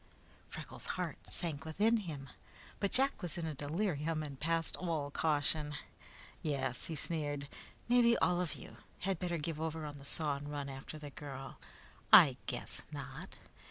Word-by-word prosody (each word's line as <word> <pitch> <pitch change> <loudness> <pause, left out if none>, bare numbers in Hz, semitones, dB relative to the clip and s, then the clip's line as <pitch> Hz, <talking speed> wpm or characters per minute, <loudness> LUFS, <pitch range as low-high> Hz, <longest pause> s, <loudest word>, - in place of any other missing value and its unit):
Freckles' - - -7
heart - - -2
sank 155 -5 -1
within 205 +9 +3
him, 155 -10 -5 0.5
but 200 - +1
Jack 270 -2 +3
was 175 -4 -4
in 170 - -2
a 160 - -2
delirium 155 +1 -1
and 140 -3 -7
past 165 +1 +1
all 160 -5 -1
caution. 150 0 +2 0.7
"Yes," 135 -5 -1
he 165 - -3
sneered. 145 -2 -1 0.4
"Mebby 240 -1 +6
all 180 0 +3
of 175 - -2
you - - -11 0.2
had 190 -2 0
better 175 -2 -1
give 155 0 -3
over 160 -1 -2
on 145 -1 -6
the 140 - -11
saw 145 -1 +3
and 145 +1 -7
run 145 -1 -3
after 135 +3 -7
the 150 -2 -8
girl. 135 -2 -7 0.5
I - - +10
guess - - -3
not! - - -7
155 Hz, 160 wpm, -35 LUFS, 145-170 Hz, 0.7 s, I